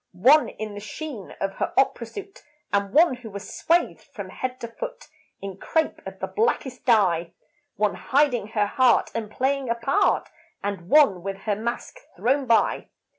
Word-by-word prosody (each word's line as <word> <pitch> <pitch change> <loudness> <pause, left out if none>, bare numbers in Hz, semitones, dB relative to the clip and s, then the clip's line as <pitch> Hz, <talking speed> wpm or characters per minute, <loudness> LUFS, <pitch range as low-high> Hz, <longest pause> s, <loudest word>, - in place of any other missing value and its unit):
One 260 +12 +5
in 215 -1 -6
the 205 - -6
sheen 225 - -7
of 195 0 -2
her - - -2
opera 250 -3 +2
suit; 395 - -9 0.3
And 200 -1 +1
one 320 -1 +5
who 240 -2 -10
was 200 0 -8
swathed 340 +2 +1
from - - -6
head 255 0 -4
to 235 - -4
foot, - - -7 0.4
In 195 -1 -6
crepe 320 +10 -1
of - - -8
the - - -3
blackest 355 - -1
dye. 180 -8 +3 0.4
One 210 -1 +1
hiding 265 -6 +1
her 215 -1 +1
heart 250 +4 +3
and 225 -2 -3
playing 265 +3 -1
a 235 - +2
part, 275 - +1 0.4
And 195 -3 -4
one 275 - +5
with 195 +1 -5
her 205 0 0
mask 235 - -4 0.2
thrown 265 +2 +1
by. 230 -1 +2
235 Hz, 175 wpm, -24 LUFS, 205-280 Hz, 0.4 s, One